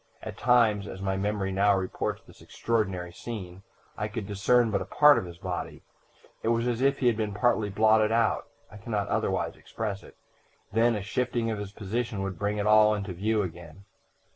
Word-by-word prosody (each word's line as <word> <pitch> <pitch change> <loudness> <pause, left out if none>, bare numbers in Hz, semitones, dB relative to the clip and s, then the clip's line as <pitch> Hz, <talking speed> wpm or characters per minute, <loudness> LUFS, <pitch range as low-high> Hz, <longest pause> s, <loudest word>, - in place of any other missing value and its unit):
At - - -6
times, 115 -4 +3
as 95 - -8
my 95 0 -1
memory 100 0 -1
now 100 +1 +3
reports 95 -1 -3
this - - -18
extraordinary 95 -6 -2
scene, 95 -4 -7 0.3
I 105 - -3
could 105 -1 -5
discern 110 +4 +2
but 100 - 0
a - - -4
part 145 -4 +6
of 95 - -6
his 85 -1 -10
body; - - -5 0.6
it - - -4
was 115 +1 +1
as 120 0 -1
if 135 +1 +3
he 130 - -2
had 120 -2 +4
been 105 -2 -3
partly 110 -2 +1
blotted 110 +1 +3
out 115 -1 +1 0.2
I 105 - -11
can 105 +3 -9
not 100 -2 -1
otherwise - - -1
express 105 -3 -5
it - - -16 0.6
then 115 +1 +3
a 105 - -3
shifting 120 +1 -1
of 110 - -3
his 100 -1 -6
position 110 0 -3
would 95 -3 -5
bring 105 0 -1
it 105 - -1
all 105 0 +5
into 100 -2 -4
view 105 +4 0
again. 85 +1 -9
105 Hz, 200 wpm, -27 LUFS, 100-115 Hz, 0.6 s, part